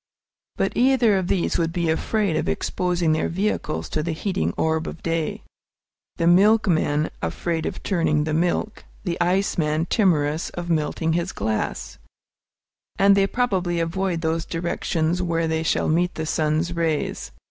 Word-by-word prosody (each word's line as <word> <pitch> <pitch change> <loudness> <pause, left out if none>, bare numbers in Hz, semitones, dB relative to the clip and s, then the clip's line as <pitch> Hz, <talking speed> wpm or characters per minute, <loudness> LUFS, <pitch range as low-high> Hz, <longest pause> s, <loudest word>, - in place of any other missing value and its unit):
But - - 0
either 250 -4 +4
of 190 -2 0
these 180 -2 0
would 165 -1 0
be 170 -1 -1
afraid 190 +3 0
of 155 - -1
exposing 175 - 0
their 155 0 0
vehicles 170 - -2
to 155 - -1
the 165 +1 -2
heating 190 +4 -1
orb 160 0 0
of - - -8
day, 165 -1 -2 0.7
the 165 - 0
milkman 175 -5 +3
afraid 165 -2 -2
of - - -6
turning 165 -5 +1
the 155 0 -2
milk, 175 +6 -1 0.2
the 175 -2 -2
ice 185 +2 +1
man 155 +1 +1
timorous 160 -6 +1
of 175 0 -3
melting 160 +1 0
his 175 +2 -1
ice, 110 -1 -2 1.0
and 200 0 +5
they 195 0 +3
probably 190 -8 0
avoid 170 +1 -1
those 160 0 0
directions 170 0 -1
where 165 -2 0
they 160 0 0
shall 160 - 0
meet 175 +3 +1
the 160 - -3
sun's 155 +2 0
rays. 165 -3 -1
170 Hz, 155 wpm, -23 LUFS, 160-185 Hz, 1.0 s, and